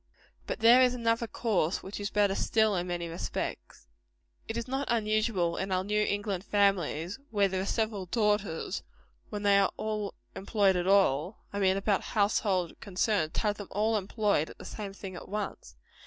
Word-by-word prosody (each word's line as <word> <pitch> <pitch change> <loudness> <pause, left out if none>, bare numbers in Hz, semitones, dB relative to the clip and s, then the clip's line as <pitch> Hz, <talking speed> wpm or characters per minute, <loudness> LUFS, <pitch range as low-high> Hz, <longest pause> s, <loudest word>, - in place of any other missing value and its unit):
But - - -4
there 235 +3 +8
is 250 -1 +4
another 230 -1 0
course 200 -8 0
which 195 +2 -6
is 205 0 -2
better 205 -2 +2
still, 220 +1 +2
in 180 0 -1
many 175 -1 -3
respects. 165 +1 -5 0.6
It 225 - -4
is 235 - -3
not 270 +2 -2
unusual 215 -6 +1
in 190 0 -3
our 185 0 +1
New 210 +2 +1
England 205 -3 -2
families, 195 - +1
where 205 -3 +3
there 190 0 -2
are 195 - -3
several 215 -5 -1
daughters, 210 -5 0 0.5
when 210 -1 -5
they 200 -1 +5
are 195 - +3 0.7
employed 200 -1 +2
at 180 0 -1
all 190 -2 +2
I 200 - -2
mean 190 -1 +3
about 200 0 +1 0.2
household 200 -4 +1
concerns 195 -4 0
to - - 0
have 210 -2 0
them 205 - -7
all 220 +2 +1
employed 200 -5 0
at - - -12
the - - -11
same 205 -2 -6
thing 195 -2 -8
at 175 - -9
once. 210 0 -5
200 Hz, 180 wpm, -29 LUFS, 185-215 Hz, 0.7 s, there